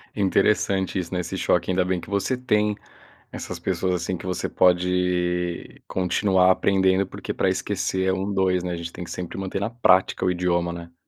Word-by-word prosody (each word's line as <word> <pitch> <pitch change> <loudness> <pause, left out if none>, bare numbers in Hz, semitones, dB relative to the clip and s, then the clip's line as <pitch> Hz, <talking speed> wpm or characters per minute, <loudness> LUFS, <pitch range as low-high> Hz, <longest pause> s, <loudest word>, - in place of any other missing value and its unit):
Interessante 95 -1 +1
isso, 90 0 -5
né, 90 - 0
esse 85 - -5
choque. - - +1
Ainda 90 0 +2
bem 90 -1 -1
que 85 - -11
você 100 +6 0
tem 105 -4 +1 0.6
essas - - -6
pessoas, 95 -1 -1
assim, 90 +1 -2
que 90 - -9
você 90 - -2
pode 90 -1 0
continuar 95 0 +2
aprendendo, 95 0 +2
porque - - -6
pra - - +1
esquecer 95 0 -1
é 95 - +3
um 95 +2 -2
dois, 95 -2 +1
né. 90 - -2
A 85 - -3
gente 85 0 -6
tem 90 - -7
que - - -10
sempre 90 -2 -6
manter 95 0 -3
na 100 +3 -2
prática 95 -6 +3
o 90 - +3
idioma, 85 -1 0
né. 85 0 -9
95 Hz, 195 wpm, -24 LUFS, 90-95 Hz, 0.6 s, é